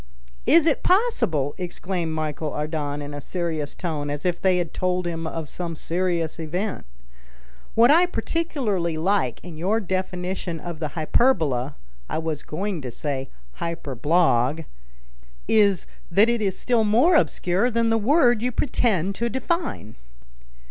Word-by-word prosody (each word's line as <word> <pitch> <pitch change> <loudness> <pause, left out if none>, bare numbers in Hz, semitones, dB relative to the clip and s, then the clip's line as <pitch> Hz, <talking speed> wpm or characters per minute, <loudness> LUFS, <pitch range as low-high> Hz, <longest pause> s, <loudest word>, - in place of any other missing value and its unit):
"Is 325 0 +6
it 310 -4 +2
possible!" 265 - +2
exclaimed 175 -2 -3
Michel 155 0 -2
Ardan 150 -1 -3
in 145 0 -7
a 145 - -6
serious 160 -3 -3
tone, 155 -5 -3
as 145 +2 -4
if 175 -1 0
they 185 -1 +3
had 175 -3 -2
told 180 0 0
him 165 -1 -3
of 160 -1 -4
some 170 +2 -5
serious 170 0 -1
event. 180 - -3 0.9
"What 235 +4 +6
I 345 +4 +6
particularly 230 - -1
like 165 - +1
in 175 -3 -9
your 200 +6 +1
definition 185 -2 -3
of 170 -1 -7
the 155 -1 -4
hyperbola 155 - +2 0.3
(I - - -2
was 160 -2 -2
going 185 +1 -3
to 130 - -5
say 135 +2 -4 0.3
hyperblague) 155 -2 +1 0.8
is 205 -4 +3 0.2
that 205 +6 +4
it 235 -1 +1
is 195 -3 0
still 240 -3 +2
more 240 +12 +4
obscure 195 - +2
than 230 -1 +1
the 225 - +3
word 245 -1 +4
you 250 +1 0
pretend 210 - +1
to 235 +4 -2
define." 260 - -3
175 Hz, 145 wpm, -24 LUFS, 155-220 Hz, 0.9 s, Is